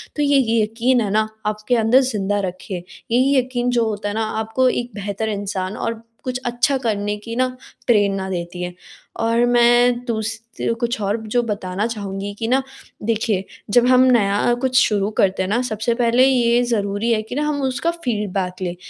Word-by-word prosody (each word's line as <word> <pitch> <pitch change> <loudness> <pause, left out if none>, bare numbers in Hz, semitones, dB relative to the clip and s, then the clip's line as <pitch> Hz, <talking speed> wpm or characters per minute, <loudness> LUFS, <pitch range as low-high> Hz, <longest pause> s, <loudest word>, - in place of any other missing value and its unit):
तो 295 - -1
ये 285 -1 +4
ये 230 -3 +2
यकीन 235 +4 +1
है 210 - -1
ना 215 +1 +2 0.2
आपके 215 +3 0
अंदर 225 +2 +4
ज़िंदा 205 -5 -1
रखें। 185 0 -4
यही 245 +9 0
यकीन 250 -1 0
जो 240 -2 +2
होता 205 -1 -2
है 205 - -4
ना 225 - 0 0.2
आपको 225 +4 +1
एक 245 0 -2
बेहतर 205 +2 -3
इंसान 200 -1 -3
और 230 -1 -3 0.2
कुछ 255 0 -3
अच्छा 245 +3 +1
करने 210 -4 -1
की 230 +2 -7
ना 255 +1 +2 0.4
प्रेरणा 200 -4 +2
देती 175 -1 -4
है। 180 0 -4 0.5
और 230 +1 +2
मैं 240 0 +4
दूस 220 -2 -2 0.2
ती - - -2
ओ - - +2
कुछ 235 0 -1
और 200 +2 0
जो 240 +3 +1
बताना 205 -2 -2
चाहूँगी 200 -2 -5
कि 225 - -2
न 260 +3 +3 0.4
देखिए 215 -3 0 0.3
जब 245 0 +6
हम 255 0 +6
नया 205 0 +3
कुछ 260 -1 +1
शुरू 205 -1 +1
करते 190 -1 +2
हैं 185 - -3
ना? 235 +4 +1
सबसे 230 -1 -1
पहले 240 +1 +4
ये 240 -2 +3
ज़रूरी 215 -1 0
है 220 -2 +2
कि 220 +3 -8
न - - 0
हम 295 -1 -1
उसका 270 +5 0
फ़ीडबैक 205 - -3
लें। 175 -1 -2
225 Hz, 195 wpm, -20 LUFS, 205-245 Hz, 0.5 s, जब